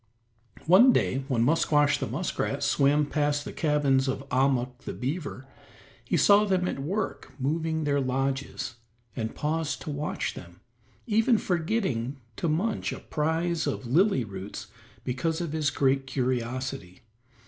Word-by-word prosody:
One 200 +10 +7
day 135 - +1
when 120 -5 +1
Musquash 150 +1 +3
the - - -2
muskrat - - -2
swam 145 +2 +3
past 145 0 0
the - - -6
cabins 145 -4 +2
of 135 +1 -3
Ahmuk 125 -1 +1
the - - -6
beaver, 135 0 -4 0.6
he - - 0
saw 205 +1 +6
them 190 -3 +1
at - - -3
work 190 +9 -3
moving 160 +3 -1
their 145 -1 +1
lodges, 130 -1 -2 0.4
and 110 -1 -3
paused 155 0 -2
to 150 - -4
watch 145 +1 -3
them, 85 +1 -12 0.4
even 225 +1 +3
forgetting 160 - -1 0.2
to 170 - -1
munch 195 +9 0
a - - -5
prize 160 +1 -1
of 135 -2 -3
lily 160 - +3
roots 100 -2 -7 0.3
because 160 +6 -1
of 170 -4 -3
his 155 -2 +1
great 135 -1 +1
curiosity. 130 -5 -3
145 Hz, 140 wpm, -27 LUFS, 130-165 Hz, 0.6 s, One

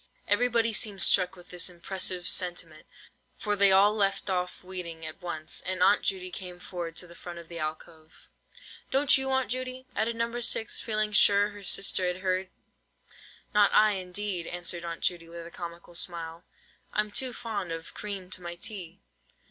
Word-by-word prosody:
Everybody 230 +1 +2
seemed 205 -2 +1
struck 185 +1 +4
with 180 -1 -15
this 180 0 0
impressive 180 0 -1
sentiment, 175 -4 +1 0.5
for 210 -1 -1
they 200 -1 +6
all 200 +2 +6
left 200 -1 0
off 180 0 -2
weeding 175 -3 -7
at 155 - -7
once, 160 -3 -2
and 185 0 0
Aunt 205 - +5
Judy 185 -2 -1
came 180 -1 -7
forward 175 -2 -6
to 180 - -3
the 170 - -13
front 175 0 -9
of 170 -1 -10
the 170 -1 -6
alcove. 155 +1 -7 0.6
"Don't 275 +1 +5
you, 265 0 0
Aunt 265 -2 +1
Judy?" 255 0 -4
added 230 +1 +1
No. 230 +1 -1
6, 225 -2 +1
feeling 215 -1 0
sure 205 0 +6
her 205 -1 -11
sister 195 -1 +2
had 180 +1 -2
heard. 185 0 0 1.0
"Not 210 -1 +5
I, 215 0 +7
indeed," 185 -1 -3
answered 175 0 -2
Aunt 170 -1 -5
Judy, 170 -2 -1
with 170 0 -8
a 170 - -10
comical 170 0 -8
smile: 170 0 -3 0.5
"I'm 210 0 0
too 255 +4 +3
fond 215 -7 -4
of 165 0 -6
cream 195 -3 -6
to 185 - -2
my 175 0 -6
tea." 180 -2 -7
185 Hz, 175 wpm, -29 LUFS, 170-210 Hz, 1.0 s, I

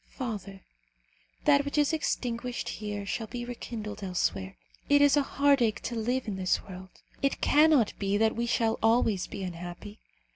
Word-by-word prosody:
Father, 205 -6 -6 0.8
that 285 -1 +5
which 285 +1 -4
is 295 +2 +3
extinguished 245 -5 -2
here 210 -1 -5
shall 220 +3 -3
be 240 +2 -5
rekindled 230 -3 -6
elsewhere. 100 - -2 0.3
It 285 0 +6
is 285 -1 +5
a 290 - +4
heartache 275 -5 +2
to 240 - -3
live 245 +3 -1
in 200 -3 -3
this 185 -1 0
world. 185 -1 -10 0.3
It 275 - 0
cannot 295 -7 +4
be 200 0 +1
that 220 +1 +2
we 235 +1 -1
shall 225 -1 +1
always 225 -4 +2
be 195 - -6
unhappy. 175 +3 -7
225 Hz, 160 wpm, -29 LUFS, 200-260 Hz, 0.8 s, It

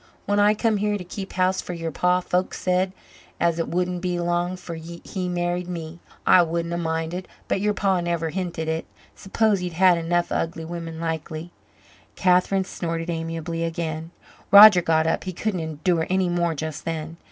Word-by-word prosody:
When 205 0 +1
I 205 +1 +5
come 220 0 +1
here 210 +1 0
to 190 - -7
keep 190 +2 -7
house 185 0 +1
for 180 - -6
yer 165 -1 -4
pa, 180 +2 +2
folks 180 +1 -1
said 185 +1 +1 0.5
as 170 -1 +1
it 165 - -1
wouldn't 180 0 -1
be 180 -1 -1
long 175 +1 -1
'fore 170 -2 -7
he 170 +3 -6
married 175 0 -1
me. 170 -1 -6 0.3
I 185 - +7
wouldn't 170 0 -1
a - - -1
minded. 165 +2 -3 0.2
But 190 - 0
yer 210 0 +2
pa 190 -3 +1
never 170 -2 -1
hinted 175 -3 -3
it. 160 0 -2 0.3
S'pose 210 +1 +1
he'd 180 -1 -4
had 180 0 +5
enough 175 +1 0
of - - +1
ugly 165 -1 -5
women 165 -1 -6
likely." 160 0 -4 0.6
Catherine 185 +1 +3
snorted 165 -1 -3
amiably 165 0 -3
again. 165 -1 -3 0.4
Roger 200 -1 +10
got 160 -1 +2
up 165 - 0
he 185 - -4
couldn't 195 +1 -2
endure 160 +1 -1
any 185 -1 +1
more 170 -1 0
just 155 0 -5
then. 165 0 -4
175 Hz, 185 wpm, -24 LUFS, 165-185 Hz, 0.6 s, Roger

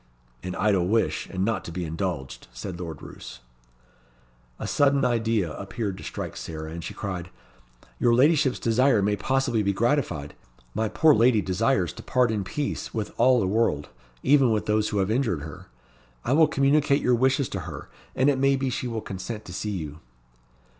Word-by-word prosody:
"An 90 0 -5
idle 95 -3 +2
wish, 110 +3 +1
and 95 0 -1
not 115 +1 -1
to - - -7
be 90 +1 -4
indulged," 80 -4 -4
said 90 -3 -7
Lord 80 -5 -7
Roos. 65 - -10 1.2
A - - -5
sudden 140 -1 +3
idea 115 -8 +1
appeared 100 +2 -4
to - - -10
strike - - -5
Sarah, 80 -1 -6
and 85 +1 -6
she - - -6
cried, 90 -4 -5 0.7
"Your 120 -1 +4
ladyship's 140 0 +4
desire 115 -1 +3
may 105 +1 +2
possibly 130 +1 0
be 100 -1 +1
gratified. 115 - 0 0.4
My 110 0 -1
poor 155 +6 +5
lady 120 -2 +4
desires 95 0 +1
to - - -10
part 125 -3 +2
in 105 -3 -1
peace 140 +9 -4
with 110 -2 -3
all 125 +1 +5
the 100 - +1
world, 95 -8 0 0.3
even 135 -2 +5
with 110 -1 0
those 105 0 +1
who 105 - -2
have 95 +1 +1
injured 110 - 0
her. 80 -1 -9 0.6
I 130 - +1
will 160 +1 +6
communicate 140 0 +2
your 125 - +3
wishes 130 +2 +2
to 95 - -4
her, - - -8 0.3
and 130 - +2
it 140 -2 +3
may 135 0 +4
be 135 -1 -1
she 125 - -3
will 115 -2 -3
consent 105 +3 -6
to 90 - -9
see 105 - -3
you." 75 -2 -7
110 Hz, 185 wpm, -25 LUFS, 95-130 Hz, 1.2 s, will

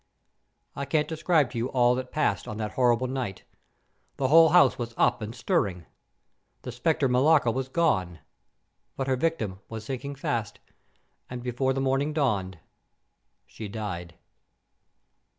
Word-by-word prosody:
"I 140 - -3
can't 150 +2 +1
describe 160 -3 +1
to 120 - -4
you 120 - -1
all 125 -2 +3
that 130 0 -4
passed 110 -9 0
on 105 - -5
that 110 -1 -3
horrible 125 -1 +2
night. 125 -7 -4 0.7
The 130 -2 0
whole 165 +2 +7
house 175 -3 +5
was 120 -1 -5
up 120 0 +2
and 110 +2 -6
stirring. 95 -7 -1 0.8
The 125 - -5
specter 140 +4 +1
Millarca 130 0 +4
was 130 +2 -3
gone. 95 - +1 0.8
But 135 - -1
her 130 -1 +1
victim 125 - -2
was 110 -1 -7
sinking 140 +2 -5
fast, 115 -6 -3 0.7
and 125 -1 -6
before 125 +2 0
the 135 - -2
morning 135 +3 0
dawned, 100 - 0 0.9
she 110 - -8
died." 95 -5 -6
125 Hz, 145 wpm, -27 LUFS, 110-140 Hz, 0.9 s, whole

